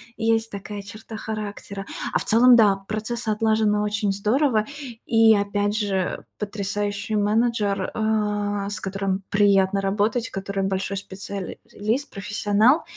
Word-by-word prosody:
есть 225 Hz, 0 st, +1 dB
такая 200 Hz, 0 st, -6 dB
черта 215 Hz, +2 st, -9 dB
характера. 205 Hz, -2 st, -6 dB, 0.3 s
А -, -, +3 dB
в -, -, -2 dB
целом, 245 Hz, +3 st, +6 dB
да, 210 Hz, -4 st, +5 dB
процесс 220 Hz, +2 st, -3 dB
отлажен 220 Hz, 0 st, +2 dB
на 210 Hz, 0 st, +1 dB
очень 210 Hz, -1 st, 0 dB
здорово. 215 Hz, +3 st, +2 dB, 0.4 s
И, 225 Hz, -1 st, +5 dB
опять 205 Hz, 0 st, 0 dB
же, 205 Hz, -3 st, 0 dB, 0.2 s
э, -, -, -19 dB, 0.2 s
потрясающий 205 Hz, +1 st, -2 dB
менеджер, 210 Hz, -2 st, +1 dB
а, 210 Hz, -2 st, 0 dB
с 205 Hz, -, -3 dB
которым 195 Hz, 0 st, -2 dB
приятно 200 Hz, -1 st, +3 dB
работать, 210 Hz, +5 st, 0 dB
который 195 Hz, 0 st, -3 dB
большой 190 Hz, 0 st, -1 dB
специал 195 Hz, 0 st, -6 dB, 0.3 s
лист, 225 Hz, +8 st, -1 dB
профессионал. 210 Hz, +7 st, +2 dB
210 Hz, 135 wpm, -24 LUFS, 200-220 Hz, 0.4 s, целом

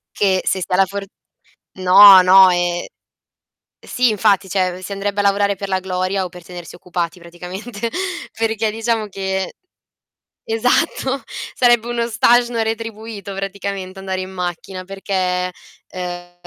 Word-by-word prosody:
Che, 190 Hz, -2 st, +2 dB
se 190 Hz, -, 0 dB
si -, -, -3 dB
ha 180 Hz, -, +2 dB
la 195 Hz, +1 st, +4 dB
for 200 Hz, +1 st, -5 dB, 0.8 s
no 190 Hz, +1 st, +9 dB
no 190 Hz, +1 st, +7 dB
e 175 Hz, 0 st, -1 dB, 0.9 s
sì 250 Hz, -1 st, +1 dB
infatti, 200 Hz, -2 st, +2 dB
cioè, 185 Hz, -1 st, -1 dB
si 200 Hz, -, -8 dB
andrebbe 200 Hz, +1 st, -3 dB
a 205 Hz, -, +2 dB
lavorare 200 Hz, 0 st, +2 dB
per 200 Hz, +1 st, -6 dB
la 190 Hz, -1 st, +1 dB
gloria 185 Hz, +1 st, -2 dB
o 180 Hz, -, -6 dB
per 180 Hz, -1 st, -13 dB
tenersi 175 Hz, -1 st, -10 dB
occupati 175 Hz, 0 st, -4 dB
praticamente 190 Hz, +6 st, -7 dB, 0.5 s
perché 220 Hz, -1 st, 0 dB
diciamo 225 Hz, -1 st, -1 dB
che 190 Hz, -1 st, -3 dB, 1.0 s
esatto, 260 Hz, +3 st, 0 dB, 0.3 s
sarebbe 240 Hz, -2 st, +3 dB
uno 235 Hz, -1 st, -1 dB
stage 240 Hz, +2 st, +3 dB
no 230 Hz, -1 st, 0 dB
retribuito 220 Hz, -2 st, -5 dB
praticamente 195 Hz, -1 st, -5 dB
andare 190 Hz, -1 st, -4 dB
in 185 Hz, -, -6 dB
macchina 185 Hz, 0 st, -5 dB
perché 185 Hz, -2 st, -2 dB, 0.4 s
ehm 175 Hz, -1 st, -7 dB
195 Hz, 140 wpm, -19 LUFS, 185-215 Hz, 1.0 s, no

